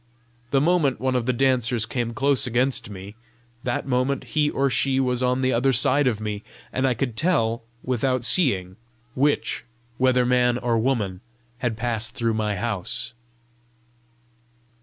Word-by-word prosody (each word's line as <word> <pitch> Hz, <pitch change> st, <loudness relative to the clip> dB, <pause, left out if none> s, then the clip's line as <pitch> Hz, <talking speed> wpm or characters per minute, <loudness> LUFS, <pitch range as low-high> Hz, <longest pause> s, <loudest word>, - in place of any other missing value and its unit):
The 135 Hz, -, +3 dB
moment 150 Hz, -5 st, +2 dB
one 130 Hz, +1 st, 0 dB
of 125 Hz, -1 st, -1 dB
the -, -, +4 dB
dancers 125 Hz, -3 st, +1 dB
came 115 Hz, 0 st, -3 dB
close 135 Hz, +1 st, +3 dB
against 125 Hz, 0 st, 0 dB
me, 100 Hz, 0 st, -9 dB, 0.5 s
that 120 Hz, -, -2 dB
moment 130 Hz, +1 st, 0 dB
he 150 Hz, -1 st, +3 dB
or 140 Hz, -1 st, +1 dB
she 135 Hz, 0 st, +1 dB
was 125 Hz, -1 st, 0 dB
on 125 Hz, +1 st, +1 dB
the 130 Hz, 0 st, +1 dB
other 125 Hz, +3 st, +2 dB
side 130 Hz, +3 st, +3 dB
of 115 Hz, -4 st, 0 dB
me, 105 Hz, -1 st, -4 dB, 0.3 s
and 130 Hz, +1 st, +1 dB
I 125 Hz, -, +1 dB
could 120 Hz, -2 st, -2 dB
tell, 115 Hz, -7 st, +1 dB, 0.2 s
without 130 Hz, 0 st, 0 dB
seeing, 95 Hz, -, +2 dB, 0.4 s
which, 145 Hz, +3 st, 0 dB, 0.4 s
whether 130 Hz, -1 st, +3 dB
man 125 Hz, -1 st, +3 dB
or 120 Hz, -2 st, 0 dB
woman, 110 Hz, -7 st, -1 dB, 0.4 s
had 120 Hz, -4 st, -2 dB
passed 115 Hz, 0 st, -2 dB
through 115 Hz, -4 st, 0 dB
my 105 Hz, -1 st, -1 dB
house. 110 Hz, +1 st, -3 dB
125 Hz, 155 wpm, -24 LUFS, 115-130 Hz, 0.5 s, the